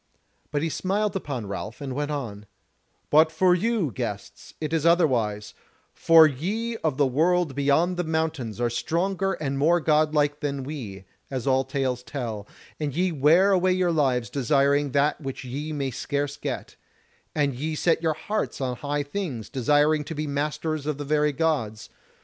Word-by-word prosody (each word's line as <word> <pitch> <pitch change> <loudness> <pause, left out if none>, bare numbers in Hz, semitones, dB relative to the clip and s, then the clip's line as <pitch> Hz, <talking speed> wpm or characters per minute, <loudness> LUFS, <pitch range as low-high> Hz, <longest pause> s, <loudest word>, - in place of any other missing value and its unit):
But 145 0 -1
he 165 - 0
smiled 195 +6 -1
upon 140 - -4
Ralph 100 +3 -6
and 135 -2 -5
went 145 +2 -2
on: 110 -9 -5 0.6
"But 155 +1 +6
for 180 +2 +3
you, 195 - 0
guests, - - -6
it 155 0 -3
is 160 -2 +1
otherwise, 125 -12 +2 0.4
for 165 -1 +7
ye 200 - -2
of 155 -9 -1
the 145 - +4
World 160 +4 +2
beyond 145 +6 +2
the 180 - 0
Mountains 160 - -2
are 120 -1 0
stronger 190 +9 -1
and 140 -4 -3
more 170 +5 +4
godlike 150 -2 +2
than 140 -2 -3
we, 115 -10 -7 0.2
as 130 -2 -4
all 130 -1 +3
tales 130 -2 -2
tell; 115 -6 -5 0.3
and 145 -3 -3
ye 180 +2 +1
wear 165 +7 +4
away 185 -1 +3
your 180 -1 +1
lives 130 -7 +1
desiring 140 +1 +2
that 145 +3 +2
which 135 -1 -6
ye 140 +5 -5
may 140 -3 -2
scarce 145 +3 -2
get; - - -5 0.6
and 145 -2 +1
ye 155 +5 -3
set 165 +1 +1
your 160 -2 +1
hearts 210 +7 -3
on 125 -2 -2
high 145 0 -2
things, 145 - -5
desiring 150 +4 +2
to 160 - -6
be 155 +1 -2
masters 150 +1 -2
of 150 -2 -1
the 145 - -5
very 150 +1 +2
Gods. 135 -8 -1
145 Hz, 170 wpm, -25 LUFS, 135-160 Hz, 0.6 s, for